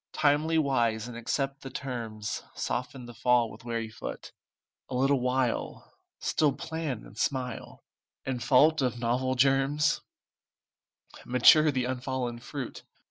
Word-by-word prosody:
Timely 155 +2 +2
wise 120 -7 +1
accept 135 +4 -3
the 135 - -7
terms, 115 -5 -4
Soften 125 0 -3
the 120 - -10
fall 120 -1 +2
with - - -13
wary 115 -1 -3
foot; 110 - -7 0.6
A 130 - -4
little 135 +2 +3
while 125 -1 -1 0.3
Still 150 -3 +2
plan 155 -4 -4
and - - -14
smile, 125 0 -3 0.4
And, 130 -2 -2
fault 150 +3 +5
of 125 -2 0
novel 125 +2 0
germs, 135 +3 +2 1.2
Mature 150 +5 +6
the 130 -3 0
unfallen 125 -1 -3
fruit. 130 +1 -7
130 Hz, 125 wpm, -29 LUFS, 120-140 Hz, 1.2 s, Mature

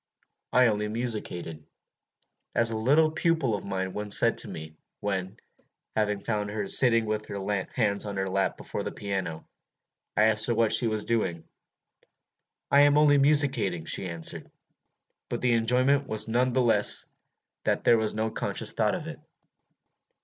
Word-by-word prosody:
I 125 0 +4
only 105 -2 0
musicated, 105 -9 -5 0.9
as 115 -1 +3
a - - -3
little 145 +8 +3
pupil 160 -6 0
of 100 - -3
mine 95 -1 -4
once 105 -1 +1
said - - +3
to - - +1
me, 80 0 -9 0.2
when, 95 0 -4 0.6
having 105 -2 0
found 105 -2 -2
her 105 -1 -4
sitting 115 -1 +4
with 105 0 -3
her - - -7 0.4
hands 105 -3 0
on 100 -1 -5
her 95 - -1
lap 95 +1 -1
before - - -6
the - - -5
piano, 95 -6 -5 0.7
I 105 - +4
asked 110 0 +2
her 120 - 0
what 115 -1 +2
she 120 - +3
was 110 -1 -1
doing: 90 -8 -2 1.2
'I 140 - +6
am 145 0 +5
only 145 -1 +5
musicating,' 135 - +1
she 95 - -1
answered. 85 -2 -4 0.8
But - - -4
the 125 -1 +2
enjoyment 130 +5 +1
was 110 0 +2
none 125 +2 +1
the 130 - +2
less 105 -3 +4 0.6
that - - 0
there 115 -1 +4
was 110 -1 0
no 110 +1 -2
conscious - - -2
thought - - 0
in - - -7
it. - - -8
110 Hz, 165 wpm, -27 LUFS, 100-125 Hz, 1.2 s, I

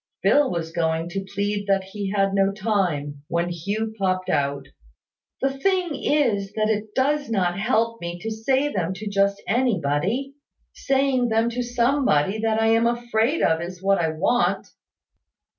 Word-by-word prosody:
Phil 290 -1 +4
was 165 -2 -3
going 165 0 -1
to 195 +2 -5
plead 205 0 -2
that 195 -1 +2
he 195 +1 -5
had 195 -1 +1
no 195 0 +3
time, 180 -9 -1
when 170 +1 -1
Hugh 205 +6 -3
popped 185 -1 0
out 140 -2 -1 0.7
"The 270 0 +2
thing 365 +4 0
is 225 -11 0
that 215 0 +1
it 215 0 -3
does 285 +1 +1
not 185 -4 0
help 230 +1 0
me 170 0 -4
to 225 - -4
say 265 +6 0
them 185 0 -1
to 215 +3 -7
just 200 0 +1
anybody. 225 - 0 0.4
Saying 270 -2 +1
them 225 +1 +1
to 245 +1 -2
somebody 240 - +1
that 220 0 +1
I 225 0 +3
am 225 +1 +4
afraid 240 +4 0
of 160 0 +2
is 180 +1 -7
what 195 0 +3
I 165 -2 +1
want." 195 +10 0
205 Hz, 160 wpm, -23 LUFS, 185-240 Hz, 0.7 s, Phil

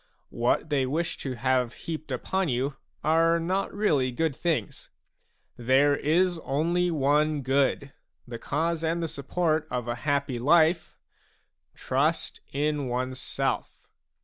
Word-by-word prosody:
What 120 +6 0
they 135 -3 +2
wish 160 +6 -2
to 135 - -4
have 125 0 0
heaped 155 -3 -5
upon 185 +8 -1
you 135 +3 -1 0.3
are 165 +2 +3
not 185 +4 -1
really 150 -11 +1
good 160 +2 -1
things; 155 - -2 0.7
there 135 +4 +3
is 175 +4 +1
only 170 +5 0
one 150 -1 +1
good, 135 +1 +1 0.3
the 120 -1 -7
cause 165 +5 -1
and 165 +1 0
the - - -1
support 155 +2 -1
of 125 -1 -3
a 120 - 0
happy 140 -3 0
life, 160 +5 +3 0.4
— - - -46
trust - - -1
in 145 0 -1
oneself. 130 +1 -3
145 Hz, 130 wpm, -27 LUFS, 130-165 Hz, 0.7 s, are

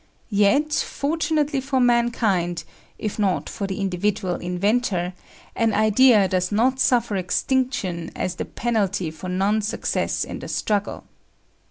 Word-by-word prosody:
Yet, 215 +10 +3
fortunately 300 -2 0
for 265 0 0
mankind, 225 -8 +1 0.3
if 215 0 -4
not 195 -3 0
for 200 - -4
the 190 +1 -4
individual 195 0 -1
inventor, 180 +1 0 0.4
an 225 -2 +1
idea 215 0 +5
does 185 0 -1
not 250 +5 +2
suffer 240 -5 +2
extinction 190 -3 -1
as 180 -1 -3
the - - -3
penalty 200 -7 -1
for 160 +4 -8
non 195 +4 +1
success 210 - -1
in - - -6
the - - -7
struggle. 205 -1 -2
210 Hz, 130 wpm, -23 LUFS, 185-245 Hz, 0.4 s, idea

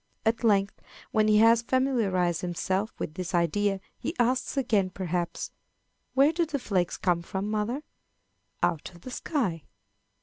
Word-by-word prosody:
At 225 +1 +1
length, 200 -3 +2 0.3
when 215 -1 +3
he 210 0 +5
has 230 +1 +6
familiarized 220 -10 +1
himself 190 +4 -1
with 155 - -4
this 180 +1 -3
idea, 195 +4 +1 0.2
he 330 - -3
asks 250 +3 +1
again, 215 -8 +2
perhaps, 180 -2 -3 0.6
"Where 280 +4 +5
do 340 +1 +2
the 305 -3 -2
flakes 185 -9 -1
come 175 -3 +1
from, 190 +4 -3
mother?" 220 +7 -1 0.8
"Out 165 +3 0
of 170 - -15
the 255 - -8
sky." 230 - -1
205 Hz, 145 wpm, -28 LUFS, 180-240 Hz, 0.8 s, has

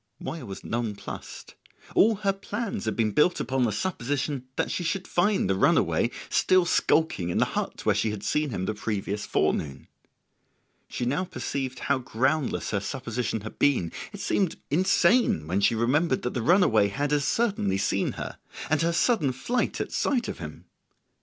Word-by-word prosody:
Moya - - -6
was 95 - -8
nonplussed: 115 -3 -5 0.4
all 220 +2 +5
her 200 -1 0
plans 200 - -4
had 110 - -1
been 110 -2 +1
built 160 - +3
upon 130 -1 0
the 110 - 0
supposition 135 - -2
that - - -1
she 180 - -2
should 180 +3 -2
find 190 - +2
the 95 - +2
runaway 95 - +3 0.2
still 185 -1 +3
skulking 160 - +2
in 85 - -1
the - - +4
hut - - -3
where - - +4
she 110 - 0
had 105 -1 -5
seen 150 -1 0
him 95 -6 -3
the 110 - -1
previous 105 -1 -3
forenoon. 70 -3 -1 1.0
She 125 - -3
now 145 +10 0
perceived 135 -7 -4
how 140 -1 +1
groundless 130 +4 0
her 100 - +1
supposition 115 -1 -3
had 110 - -9
been; 125 -13 +2 0.2
it - - -8
seemed 190 -5 0 0.2
insane 180 - +3
when 90 +5 0
she 115 - +3
remembered 130 +6 +1
that 125 - -2
the 120 - -2
runaway 120 - +4
had 140 +8 -1
as 145 -1 +2
certainly 140 - +1
seen 100 - 0
her - - -7 0.3
and 155 - +3
her 170 +1 +1
sudden 170 - +2
flight 235 - -1
at - - -3
sight 250 -5 0
of - - -5
him. 75 -3 -8
135 Hz, 175 wpm, -26 LUFS, 110-175 Hz, 1.0 s, all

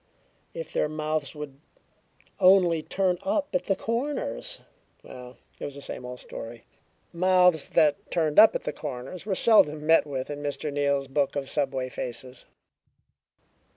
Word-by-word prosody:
If - - -7
their - - 0
mouths 155 -1 -3
would 145 -2 -8 0.8
only 180 -3 +5
turn 180 +2 0
up 295 0 -1
at 180 0 0
the 195 - +1
corners! 230 - -3 0.4
Well, 125 -1 -11 0.2
it - - -8
was 140 - -6
the 140 - -8
same 125 - -6
old 125 0 -8
story. 115 0 -9 0.5
Mouths 180 -2 +3
that 150 -2 +2
turned 155 -1 +2
up 220 - +8
at - - -2
the - - -3
corners 145 +7 -7
were 195 - 0
seldom 155 -9 +4
met 160 -1 +4
with 135 0 -4
in 145 0 -6
Mr. 145 0 -3
Neal's 140 -1 0
book 140 +1 0
of 140 -2 -3
subway 135 -3 -1
faces. 125 0 -6
150 Hz, 155 wpm, -26 LUFS, 135-180 Hz, 0.8 s, up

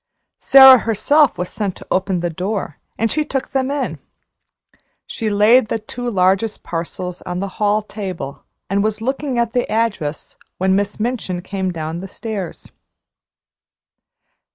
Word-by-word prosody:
Sara 265 -2 +9
herself 275 +7 +2
was 180 0 -3
sent 200 -4 -3
to - - -12
open 185 -1 0
the 175 0 -1
door, 185 -1 -4 0.2
and 225 0 0
she 305 - +1
took 270 -3 -4
them 265 -1 0
in. 285 0 -2 1.1
She 220 - -3
laid 215 +4 +5
the - - -1
two 240 +3 -5
largest 195 +1 +1
parcels 175 +2 -5
down - - -6
on 180 - -3
the 200 - -2
hall 210 +1 +2
table 190 -9 -6 0.2
and 200 +1 +1
was 215 0 -1
looking 265 +2 -2
at 235 -1 0
the 245 - 0
address, 210 -10 -2 0.2
when 190 +1 +2
Miss 205 +1 -1
Minchin 215 -6 -2
came 190 -1 -3
down 160 0 -4
the 195 - -7
stairs. 200 -3 -6
205 Hz, 155 wpm, -19 LUFS, 185-235 Hz, 1.1 s, Sara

